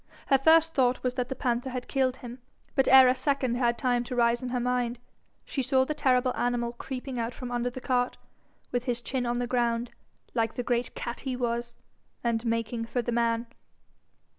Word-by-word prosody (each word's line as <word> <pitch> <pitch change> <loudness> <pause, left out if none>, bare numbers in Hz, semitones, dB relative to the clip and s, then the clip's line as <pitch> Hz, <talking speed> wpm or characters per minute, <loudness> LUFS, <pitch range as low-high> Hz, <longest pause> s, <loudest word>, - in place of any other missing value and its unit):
Her 270 - +5
first 325 +3 +5
thought 255 -2 +2
was 250 -1 0
that 250 -1 -2
the 265 - -3
panther 245 0 -1
had 250 -1 -5
killed 260 -2 +1
him, 245 0 -9 0.3
but 270 -2 +2
ere 265 0 +9
a 250 - +5
second 260 -1 0
had 240 -1 +1
time 245 -2 +1
to 250 - -5
rise 235 0 +3
in 255 - -4
her 250 0 -1
mind, 245 -1 0 0.5
she 270 - -2
saw 260 0 +2
the 305 - -2
terrible 255 -3 +2
animal 240 -1 -1
creeping 255 +1 -5
out 230 +1 -3
from 250 -1 -6
under 245 0 0
the 255 +1 -8
cart, 250 -1 0 0.5
with 245 0 -1
his 245 -2 -1
chin 245 0 -2
on 240 0 0
the 245 - 0
ground, 240 -1 0 0.4
like 225 -2 0
the 245 - -2
great 240 0 -1
cat 235 - -5
he 265 -2 -3
was, 235 -1 -2 0.5
and 230 -1 0
making 230 0 -1
for 240 +1 -2
the 240 - -2
man. 230 0 +1
245 Hz, 205 wpm, -28 LUFS, 235-255 Hz, 0.5 s, ere